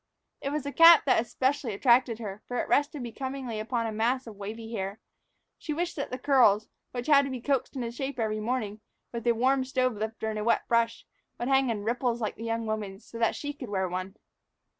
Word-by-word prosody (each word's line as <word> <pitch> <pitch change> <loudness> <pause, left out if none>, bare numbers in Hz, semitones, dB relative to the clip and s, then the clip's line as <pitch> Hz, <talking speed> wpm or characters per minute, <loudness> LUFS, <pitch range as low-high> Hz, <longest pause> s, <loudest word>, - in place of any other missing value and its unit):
It 275 - -2
was 295 0 -2
the 285 - -4
cap 330 +2 +8
that 240 -4 +3
specially 260 -2 0
attracted 240 +1 +4
her, 210 -2 -7
for 245 - -3
it - - -1
rested 290 -1 +1
becomingly 260 -1 -5
upon 230 +1 -1
a 225 - -2
mass 240 +5 0
of 225 -3 -9
wavy 220 +3 -7
hair. 195 0 -4 0.6
She 305 - -3
wished 345 +3 -2
that 280 - -4
her 255 - -3
curls, 245 -6 +4 0.2
which 245 -1 -5
had 285 -2 +6
to - - -4
be 260 -1 -4
coaxed 270 +2 -1
into 240 -3 -3
shape 270 +3 -4
every 215 -1 0
morning 215 -2 -2 0.3
with 235 0 -4
a 235 - +5
warm 260 +3 +2
stove 255 -1 0
lifter 220 +1 -3
and 215 - -3
a - - -2
wet 235 - +1
brush, 230 0 +1 0.3
would 240 - -3
hang 270 -1 +3
in 210 -3 -2
ripples 240 +1 0
like 215 -3 -2
the 225 - -9
young 230 0 -1
woman's, 210 -2 -4
so 230 - -9
that 230 - +2
she 290 0 -4
could 265 -5 -8
wear 190 -2 0
one. 185 +2 -4
235 Hz, 225 wpm, -28 LUFS, 220-265 Hz, 0.6 s, cap